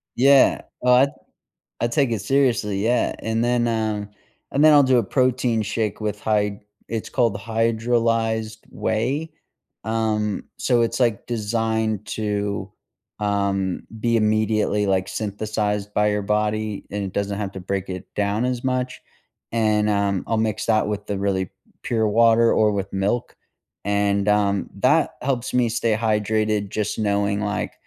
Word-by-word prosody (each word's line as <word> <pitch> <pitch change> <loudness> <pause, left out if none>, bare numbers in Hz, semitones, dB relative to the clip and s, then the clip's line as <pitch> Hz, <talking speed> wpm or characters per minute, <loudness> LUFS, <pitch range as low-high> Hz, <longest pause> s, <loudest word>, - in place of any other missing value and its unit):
Yeah. 135 +1 +5 0.2
Oh, 125 0 +5
I 130 +3 +6 0.7
I 120 - +2
take 130 +1 +1
it 110 -3 -1
seriously, 115 -8 +1
yeah, 120 +2 +1
and 110 +1 -1
then, 120 -1 +1
um 110 -2 -1 0.4
and 140 - +2
then 155 -1 +8
I'll 145 - +7
do 130 -1 +4
a 120 - +3
protein 125 -3 +1
shake 105 0 -2
with 105 -1 -3
hy 105 -2 0 0.3
It's 115 -2 -4
called 115 -5 +1
hydrolyzed 115 0 0
whey, 130 +9 -2 0.5
um, 110 -2 -1
so 120 -2 +2
it's, 115 - 0
like, 115 -4 +1
designed 110 -2 -1
to, 105 -2 -2 0.5
um, 100 -2 -1 0.2
be 115 +1 +1
immediately, 110 -1 +1
like, 95 -1 +1
synthesized 105 -1 -2
by 105 0 +2
your 105 0 0
body, 105 0 -1
and 100 0 -2
it 95 - -4
doesn't 100 0 -2
have 100 -2 -3
to 95 - -6
break 95 +1 -3
it 95 -1 -6
down 105 +3 0
as 125 -1 -2
much. 130 -1 -2 0.5
And, 105 -2 +2
um, 100 -2 0
I'll 115 0 0
mix 110 -1 -1
that 110 -2 +2
with 105 -1 -3
the 100 - -2
really 95 -2 -1 0.3
pure 110 -2 +1
water 115 +1 +4
or 105 -1 +3
with 100 -1 -3
milk, 100 +5 -1 0.5
and, 100 0 +1
um, 100 -1 +1
that 150 +7 +3
helps 125 -2 -2
me 125 -2 +2
stay 115 -1 +1
hydrated, 110 -1 0
just 105 0 -2
knowing, 100 -1 0
like, 105 0 -2
110 Hz, 155 wpm, -22 LUFS, 105-115 Hz, 0.7 s, then